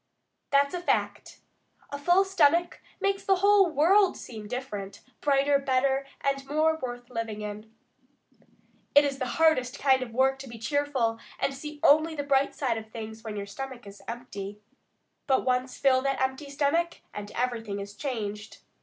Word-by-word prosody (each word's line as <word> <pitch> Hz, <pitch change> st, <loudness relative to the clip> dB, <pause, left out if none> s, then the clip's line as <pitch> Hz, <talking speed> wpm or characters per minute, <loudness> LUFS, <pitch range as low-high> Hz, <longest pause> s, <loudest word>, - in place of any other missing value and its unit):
That's 280 Hz, 0 st, +3 dB
a 355 Hz, -, -3 dB
fact. -, -, -1 dB, 0.5 s
A 285 Hz, -, -4 dB
full 350 Hz, +6 st, +4 dB
stomach 345 Hz, -2 st, +2 dB, 0.2 s
makes 395 Hz, 0 st, 0 dB
the 385 Hz, -, +3 dB
whole 400 Hz, 0 st, +5 dB
world 360 Hz, +6 st, +4 dB
seem 215 Hz, -3 st, -9 dB
different, 205 Hz, -5 st, -6 dB, 0.2 s
brighter, 280 Hz, 0 st, +3 dB
better, 270 Hz, 0 st, +1 dB
and 275 Hz, -1 st, 0 dB
more 310 Hz, +2 st, +2 dB
worth 245 Hz, -1 st, -6 dB
living 225 Hz, -3 st, -4 dB
in. 210 Hz, +1 st, -7 dB, 1.2 s
It 290 Hz, 0 st, +8 dB
is 275 Hz, -1 st, -2 dB
the 255 Hz, -, -1 dB
hardest 295 Hz, -6 st, +3 dB
kind 265 Hz, -2 st, +3 dB
of 255 Hz, -, -3 dB
hard 230 Hz, -, -13 dB
work 270 Hz, +1 st, +3 dB
to 270 Hz, -, -8 dB
be 230 Hz, -, -9 dB
cheerful 255 Hz, -2 st, 0 dB, 0.2 s
and 275 Hz, -, -1 dB
see 300 Hz, +2 st, -8 dB
only 315 Hz, +2 st, +5 dB
the 290 Hz, -, -2 dB
bright 275 Hz, -1 st, +2 dB
side 240 Hz, -5 st, -1 dB
of 220 Hz, 0 st, -12 dB
things 220 Hz, 0 st, -8 dB
when 220 Hz, -2 st, -5 dB
your 200 Hz, -, -4 dB
stomach 255 Hz, +3 st, -7 dB
is 200 Hz, 0 st, -12 dB
empty. 210 Hz, -4 st, -7 dB, 0.7 s
But 265 Hz, -2 st, +2 dB
once 255 Hz, 0 st, 0 dB
fill 260 Hz, -1 st, +4 dB
that 275 Hz, 0 st, -1 dB
empty 265 Hz, +2 st, -2 dB
stomach, 300 Hz, +5 st, 0 dB
and 205 Hz, 0 st, -6 dB
everything 230 Hz, -5 st, -2 dB
is 200 Hz, 0 st, -7 dB
changed. 210 Hz, -4 st, -5 dB
265 Hz, 170 wpm, -28 LUFS, 230-290 Hz, 1.2 s, It